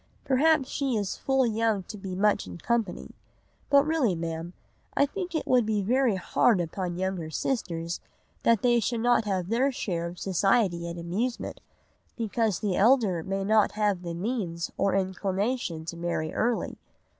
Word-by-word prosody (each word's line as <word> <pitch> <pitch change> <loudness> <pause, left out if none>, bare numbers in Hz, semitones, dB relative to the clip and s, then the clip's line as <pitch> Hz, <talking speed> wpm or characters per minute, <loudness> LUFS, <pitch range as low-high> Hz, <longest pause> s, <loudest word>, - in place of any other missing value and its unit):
Perhaps 280 +1 +3
she 275 -3 -1
is 200 -2 -2
full 270 -1 +1
young 220 -3 +1
to 210 - -9
be 190 -2 -6
much 205 - +2
in 90 -1 -8
company. 230 - -2 0.6
But 280 0 +6
really, 300 - +2
Ma'am, 165 +1 -4 0.4
I 280 - +5
think 355 +3 -5
it 315 - -1
would 250 -2 +4
be 215 -2 0
very 245 +1 +2
hard 190 +3 +2
upon 175 +1 -3
younger 185 -3 -2
sisters 170 - -2 0.4
that 230 -3 +3
they 240 -1 +4
should 230 +1 -1
not 240 -1 +3
have 190 -3 -1
their 255 +5 +2
share 175 -9 -2
of 175 +1 -8
society 190 -1 +1
and 170 - -6
amusement, 195 +9 -3 0.6
because 220 -3 0
the 200 -4 0
elder 210 -5 +4
may 195 +3 -2
not 215 +1 +3
have 210 -4 +1
the 170 -2 -5
means 175 -4 -3
or 195 -1 +1
inclination 190 -1 -1
to 170 - -5
marry 170 -2 -2
early. 235 +1 -1
205 Hz, 165 wpm, -27 LUFS, 175-240 Hz, 0.6 s, But